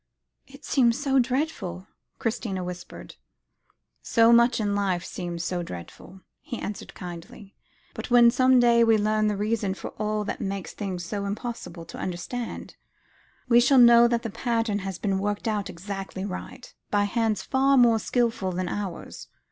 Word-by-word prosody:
"It 275 +2 -14
seems 240 -3 +3
so 275 -2 +2
dreadful," 250 - -2 0.3
Christina 215 -5 -3
whispered. 180 0 -9 0.8
"So 230 0 +4
much 235 +1 +4
in 205 -2 0
life 190 -3 -1
seems 175 -2 -5
so 175 0 -2
dreadful," 170 - -10 0.2
he 240 - -6
answered 205 -1 -7
kindly; 180 +3 -9 0.4
"but - - -7
when 240 -1 +7
some 255 +1 +4
day 235 -1 +5
we 225 -1 +4
learn 215 0 +1
the 210 -1 -1
reason 210 -2 -1
for - - -7
all 215 0 -1
that - - -5
made 195 -1 -3
things 185 -4 -5
so 200 +2 -4
impossible 200 -5 -6
to - - -10
understand, 190 +7 -5 0.7
we 240 -1 +6
shall 265 +3 +4
know 235 -1 +8
that 235 -1 0
the 225 - -4
pattern 225 -3 -1
has 195 -2 -5
been 195 -2 -1
worked 205 +2 -2
out 210 -3 -1
exactly 195 +1 -6
right, 200 +5 -8 0.2
by 205 -1 +2
Hands 220 +1 0
far 270 +1 +2
more 235 -3 +5
skilful 230 -6 0
than 180 0 -3
ours. 195 -5 -6
210 Hz, 160 wpm, -26 LUFS, 190-235 Hz, 0.8 s, know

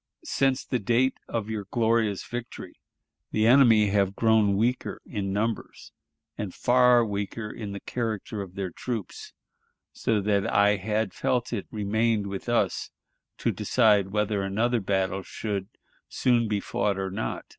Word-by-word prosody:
Since 135 -1 0
the 125 - -1
date 120 +5 +1
of 115 -3 -3
your 110 -2 -4
glorious 115 -4 +1
victory 120 -1 -7 0.5
the 110 0 +1
enemy 115 -4 +6
have 100 -1 +1
grown 110 -3 +3
weaker 120 +4 -1
in 100 -4 -3
numbers, 110 +2 -3 0.5
and 100 -3 -4
far 125 -1 +4
weaker 105 +1 -4
in 105 -3 -6
the 100 - -5
character 110 -3 -4
of 95 -2 -9
their 95 -3 -3
troops, 115 -2 -6 0.6
so 110 -2 0
that 100 -1 0
I 105 +1 +4
had 105 +1 -1
felt 120 -1 -1
it 105 - -3
remained 110 0 0
with 100 +3 -5
us 120 - 0 0.5
to - - 0
decide 105 -5 +3
whether 105 0 0
another 115 +5 0
battle 95 0 0
should 100 0 -4 0.4
soon 120 -3 +2
be 105 -1 0
fought 100 0 -1
or 95 -1 -3
not. 110 +4 -4
105 Hz, 145 wpm, -26 LUFS, 100-115 Hz, 0.6 s, enemy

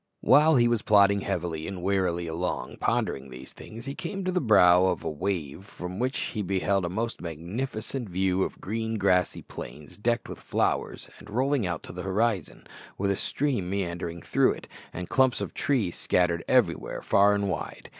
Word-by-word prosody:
While 155 +2 +6
he 120 -2 +5
was 120 -2 +1
plodding 100 -1 +5
heavily 85 -5 -3
and 95 -3 -6
wearily 90 -3 +1
along, 85 +2 -3
pondering 65 0 -1
these 65 +1 -11
things, 115 +3 -10
he 135 - -4
came 195 +6 -5
to 185 - +1
the 180 - +1
brow 95 -6 +6
of 90 -2 -1
a - - -2
wave 90 0 -3
from 90 0 -7
which 130 +2 0
he 110 - -3
beheld 95 0 0
a - - -2
most 115 +5 -3
magnificent 105 - -4
view 95 +1 +1
of - - -2
green 110 +2 -3
grassy 90 -3 +2
plains 75 +5 -9
decked 120 +2 0
with - - -8
flowers, - - -1
and 105 - -13
rolling 130 0 +1
out 85 -3 -3
to - - -9
the 90 - -5
horizon, 100 -1 -1 0.3
with 100 0 +1
a - - +1
stream 125 -6 -1
meandering 85 -3 -3
through - - +3
it, - - -11 0.2
and 90 0 -6
clumps 130 -1 +3
of - - -4
trees 115 -11 0
scattered 85 -1 +1
everywhere 115 -10 +1
far 100 +1 +4
and 100 0 0
wide. 95 - -5
95 Hz, 185 wpm, -27 LUFS, 90-115 Hz, 0.3 s, While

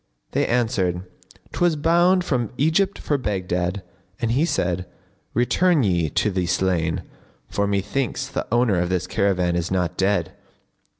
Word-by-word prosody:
they - - +1
answered, 105 -7 0 0.5
"'Twas 175 -2 +2
bound 175 +4 +3
from 125 - -1
Egypt 165 +7 +2
for 145 -2 -1
Baghdad;" 90 -3 -2 0.4
and 115 -2 0
he 140 +7 +2
said, 90 - -1 0.5
"Return 150 +6 +3
ye 85 -6 +1
to 105 - +1
the 90 -2 -1
slain, 90 -3 0 0.4
for 100 0 -1
methinks 100 +6 -1
the - - -4
owner 115 -6 +3
of 90 0 0
this 90 -1 0
caravan 90 -4 +1
is 85 0 -1
not 90 -2 -1
dead." 100 +2 +1
100 Hz, 140 wpm, -23 LUFS, 90-130 Hz, 0.5 s, bound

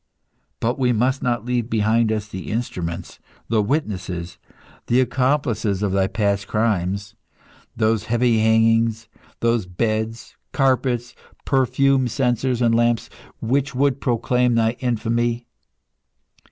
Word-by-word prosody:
But 120 +4 -1
we 125 -2 +2
must 130 +4 +1
not 120 -2 -1
leave 125 -1 -1
behind 110 0 +2
us 105 -1 -2
the 95 -3 -7
instruments, 90 -6 -4 0.3
the 110 -1 +3
witnesses, 95 - -3 0.5
the 120 - +3
accomplices 125 -5 0
of 100 - 0
thy 95 0 +2
past 100 -1 -1
crimes; 100 -2 -1 0.6
those 110 -1 +1
heavy 120 0 +2
hangings, 115 0 +2 0.3
those 115 -4 +1
beds, 110 +4 -2 0.2
carpets, 130 -2 +1 0.3
perfume 135 0 +2
censers 125 0 0
and 115 -1 +3
lamps, 120 0 +1 0.3
which 130 +3 0
would 140 0 +1
proclaim 125 0 +1
thy 115 -1 +3
infamy! 120 0 -1
115 Hz, 115 wpm, -22 LUFS, 105-125 Hz, 0.6 s, the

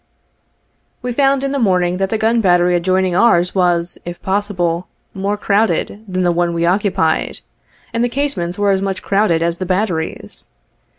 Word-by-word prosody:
We 250 -1 -2
found 275 +1 +2
in 275 - -1
the 280 - -1
morning 180 -5 +1
that 195 0 -1
the 220 - 0
gun 225 +2 +2
battery 180 -2 +3
adjoining 185 +1 +1
ours 180 -3 +3
was, 175 -2 0
if 175 0 -7
possible, 185 -3 -1 0.3
more 200 +2 -2
crowded 210 0 0
than 185 -1 -1
the 175 - +3
one 170 0 0
we 170 0 0
oc 185 +4 +2
cupied, 170 -6 0 0.5
and 230 +1 0
the 245 - +1
casemates 230 -10 -2
were 205 -1 +2
as 190 0 +1
much 195 -1 -3
crowded 195 -5 +1
as 170 0 0
the 185 - -4
batteries. 185 -4 -3
190 Hz, 175 wpm, -17 LUFS, 175-210 Hz, 0.5 s, battery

